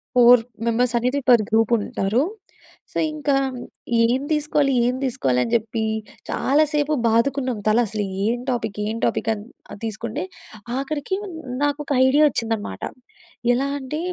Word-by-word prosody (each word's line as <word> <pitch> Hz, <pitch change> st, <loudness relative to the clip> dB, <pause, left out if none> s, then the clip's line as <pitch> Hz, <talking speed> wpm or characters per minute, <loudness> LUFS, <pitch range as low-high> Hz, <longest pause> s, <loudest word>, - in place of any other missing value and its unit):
Four 245 Hz, -1 st, +7 dB, 0.2 s
members 235 Hz, +1 st, +1 dB
అనేది 250 Hz, +4 st, 0 dB
per 235 Hz, -3 st, +6 dB
group 225 Hz, 0 st, +2 dB
ఉంటారు. 205 Hz, +2 st, 0 dB, 0.7 s
So, -, -, -5 dB, 0.2 s
ఇంకా 295 Hz, -2 st, 0 dB, 0.7 s
ఏం 245 Hz, +3 st, +2 dB
తీసుకోవాలి? 300 Hz, -2 st, +2 dB
ఏం 250 Hz, +1 st, +1 dB
తీసుకోవాలి? 135 Hz, -, +1 dB
అని 230 Hz, -, -4 dB
చెప్పి 225 Hz, 0 st, -1 dB, 0.5 s
చాలాసేపు 300 Hz, +1 st, +2 dB
బాదుకున్నాం 250 Hz, +2 st, +1 dB
తల 215 Hz, +2 st, +4 dB
అసలు 210 Hz, 0 st, -3 dB, 0.2 s
ఏం 235 Hz, +3 st, 0 dB
టాపిక్ 220 Hz, -5 st, -2 dB
ఏం 220 Hz, +2 st, -2 dB
టాపిక్ -, -, 0 dB
అని 205 Hz, -1 st, -8 dB, 0.4 s
తీసుకుంటే 220 Hz, -1 st, -4 dB, 0.5 s
ఆఖరికి 290 Hz, +5 st, -2 dB, 0.5 s
నాకు 290 Hz, 0 st, +1 dB
ఒక -, -, -7 dB
ఐడియా 285 Hz, +4 st, +5 dB
వచ్చిందన్నమాట. 225 Hz, -, -3 dB, 0.7 s
ఎలా 265 Hz, +3 st, 0 dB
అంటే 275 Hz, +3 st, -4 dB
245 Hz, 130 wpm, -22 LUFS, 225-280 Hz, 0.7 s, Four